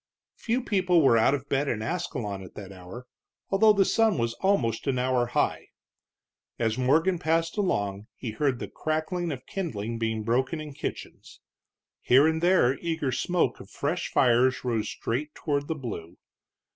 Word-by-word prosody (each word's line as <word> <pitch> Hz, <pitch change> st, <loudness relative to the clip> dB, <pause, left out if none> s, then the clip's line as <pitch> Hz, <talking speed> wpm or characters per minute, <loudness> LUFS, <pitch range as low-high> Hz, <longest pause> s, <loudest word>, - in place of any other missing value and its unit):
Few 240 Hz, +2 st, -1 dB
people 185 Hz, -7 st, +2 dB
were 125 Hz, -4 st, +5 dB
out 115 Hz, +5 st, +4 dB
of 140 Hz, 0 st, -7 dB
bed 140 Hz, 0 st, 0 dB
in 110 Hz, -5 st, -2 dB
Ascalon 120 Hz, -, -3 dB
at 95 Hz, -, -12 dB
that 100 Hz, -2 st, -9 dB
hour, 95 Hz, +7 st, -10 dB, 0.5 s
although 215 Hz, +2 st, +6 dB
the 200 Hz, -2 st, +3 dB
sun 225 Hz, -3 st, +2 dB
was 115 Hz, -1 st, 0 dB
almost 130 Hz, -, +1 dB
an 135 Hz, -2 st, +1 dB
hour 125 Hz, -1 st, +1 dB
high. 120 Hz, -, -1 dB, 0.9 s
As 115 Hz, -2 st, 0 dB
Morgan 160 Hz, +8 st, +2 dB
passed 165 Hz, 0 st, 0 dB
along 105 Hz, -, -1 dB
he 120 Hz, -, -5 dB
heard 130 Hz, +3 st, 0 dB
the -, -, -5 dB
crackling 160 Hz, +2 st, -2 dB
of 130 Hz, -3 st, -7 dB
kindling 115 Hz, -, -4 dB
being 110 Hz, -1 st, -1 dB
broken 130 Hz, +8 st, 0 dB
in 150 Hz, -2 st, -7 dB
kitchens. -, -, -7 dB, 0.6 s
Here 130 Hz, +4 st, +5 dB
and 160 Hz, 0 st, 0 dB
there 175 Hz, -8 st, +4 dB
the -, -, -15 dB
eager 160 Hz, -5 st, -1 dB
smoke 135 Hz, 0 st, 0 dB
of 95 Hz, -, -12 dB
fresh 155 Hz, +10 st, -2 dB
fires 130 Hz, +1 st, +3 dB
rose 115 Hz, -4 st, -1 dB
straight 145 Hz, +6 st, -3 dB
toward 145 Hz, -2 st, -2 dB
the 160 Hz, -, -2 dB
blue. 110 Hz, -, -7 dB
135 Hz, 170 wpm, -27 LUFS, 115-165 Hz, 0.9 s, although